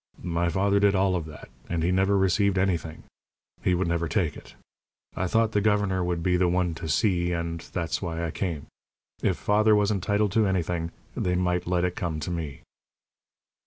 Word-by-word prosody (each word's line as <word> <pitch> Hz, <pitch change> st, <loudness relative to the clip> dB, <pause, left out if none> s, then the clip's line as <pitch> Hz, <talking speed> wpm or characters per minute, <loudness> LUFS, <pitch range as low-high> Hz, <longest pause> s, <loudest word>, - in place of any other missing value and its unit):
My 85 Hz, 0 st, 0 dB
father 100 Hz, +3 st, +2 dB
did 100 Hz, 0 st, +4 dB
all 95 Hz, -1 st, +2 dB
of 85 Hz, -3 st, -3 dB
that, 75 Hz, -, -11 dB, 0.2 s
and 85 Hz, -2 st, -1 dB
he 85 Hz, -, +2 dB
never 95 Hz, +2 st, +3 dB
received 95 Hz, +1 st, +2 dB
anything. 85 Hz, -4 st, -1 dB, 0.6 s
He 90 Hz, -, +2 dB
never 85 Hz, -1 st, 0 dB
would -, -, -6 dB
take 90 Hz, -8 st, 0 dB
it. -, -, -13 dB, 0.6 s
I 95 Hz, -, -1 dB
thought 115 Hz, +3 st, +2 dB
the 105 Hz, -, +1 dB
governor 100 Hz, -3 st, +1 dB
would 90 Hz, -1 st, -2 dB
be 90 Hz, 0 st, +2 dB
the 90 Hz, 0 st, +3 dB
one 90 Hz, -1 st, +1 dB
to 80 Hz, 0 st, -6 dB
see, 90 Hz, 0 st, +1 dB
and 85 Hz, 0 st, -3 dB
that's 85 Hz, -3 st, -2 dB
why 85 Hz, -2 st, -3 dB
I 80 Hz, -, -3 dB
came. 85 Hz, -6 st, -3 dB, 0.6 s
If -, -, +1 dB
father 105 Hz, +1 st, +3 dB
was 105 Hz, 0 st, +2 dB
entitled 100 Hz, +1 st, +1 dB
to 110 Hz, 0 st, +3 dB
anything, 85 Hz, -3 st, -1 dB, 0.3 s
they 90 Hz, 0 st, 0 dB
might 90 Hz, -1 st, 0 dB
let 90 Hz, 0 st, +1 dB
it 90 Hz, -, -2 dB
come 80 Hz, -3 st, -3 dB
to 85 Hz, -, -3 dB
me." 80 Hz, -6 st, -5 dB
90 Hz, 195 wpm, -26 LUFS, 85-100 Hz, 0.6 s, did